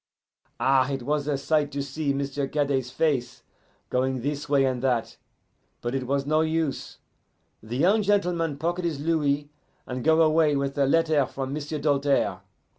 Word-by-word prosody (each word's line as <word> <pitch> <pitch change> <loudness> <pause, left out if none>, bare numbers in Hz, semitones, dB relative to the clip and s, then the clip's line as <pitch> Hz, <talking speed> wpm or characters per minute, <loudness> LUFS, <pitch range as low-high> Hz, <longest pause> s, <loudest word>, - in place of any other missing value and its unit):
Ah, 130 +1 +3
it 135 -2 -3
was 145 +1 -1
a 145 -2 0
sight 145 +1 0
to 140 0 -2
see 140 +1 -2
M'sieu' 140 0 -2
Cadet's 140 -3 0
face, 130 -4 -1 0.5
going 130 0 0
this 145 +2 -3
way 140 -2 +4
and 130 -2 -1
that. 125 -3 -1 0.6
But 120 +1 -3
it 130 -2 -2
was 140 +1 0
no 155 +2 +2
use: 160 -2 -2 0.6
the 115 +3 -5
young 195 +9 +4
gentleman 180 -7 +1
pocket 175 +4 -2
his 165 -5 -2
louis, 145 -2 0 0.3
and 125 -1 -5
go 160 +1 +5
away 155 -1 +3
with 140 0 -1
a 140 - +3
letter 155 -2 +3
from 135 0 -5
M'sieu' 150 +1 -4
Doltaire. 140 -1 +1
145 Hz, 165 wpm, -26 LUFS, 135-155 Hz, 0.6 s, go